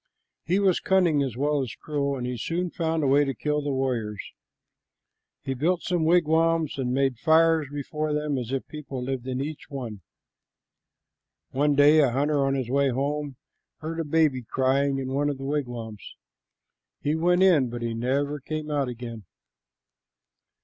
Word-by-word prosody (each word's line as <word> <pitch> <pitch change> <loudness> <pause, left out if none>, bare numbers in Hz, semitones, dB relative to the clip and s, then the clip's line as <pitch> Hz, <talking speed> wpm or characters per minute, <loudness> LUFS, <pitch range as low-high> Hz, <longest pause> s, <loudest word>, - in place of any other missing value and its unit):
He 180 +4 +2
was 195 -3 +3
cunning 175 -6 +3
as 130 -4 -2
well 145 +1 +1
as 120 -4 -5
cruel, 140 -1 -2
and 125 - -4
he 125 0 -3
soon 170 +9 -2
found 160 -1 -1
a - - +2
way 140 +2 +5
to 135 -2 -2
kill 150 +4 -1
the 145 - -3
warriors. 120 -6 -2 1.2
He 135 - -2
built 165 +7 0
some 175 -3 0
wigwams 165 -2 +2
and 125 -2 -1
made 135 -2 +1
fires 160 0 +4
before 150 +2 -3
them 150 -1 -1
as 120 0 -5
if 135 -1 -2
people 140 -4 -7
lived 130 -1 -4
in 130 0 -2
each 145 +2 -5
one. 120 -8 -6 1.5
One 145 +2 +2
day 145 +2 +6
a 140 -4 +5
hunter 140 +3 +1
on 135 0 +1
his 130 -3 -3
way 140 0 +3
home 140 +2 -2 0.4
heard 165 +1 -5
a - - 0
baby 150 -4 +2
crying 135 +3 +1
in 130 -1 -3
one 145 +1 +1
of 145 - -3
the 135 - -7
wigwams. 120 -7 -4 0.9
He 145 - 0
went 175 +3 +3
in, 155 -10 +4
but 120 0 -5
he 115 -1 -2
never 140 +5 -1
came 155 +2 -5
out 140 -2 0
again. 115 -3 -7
140 Hz, 170 wpm, -26 LUFS, 130-155 Hz, 1.5 s, day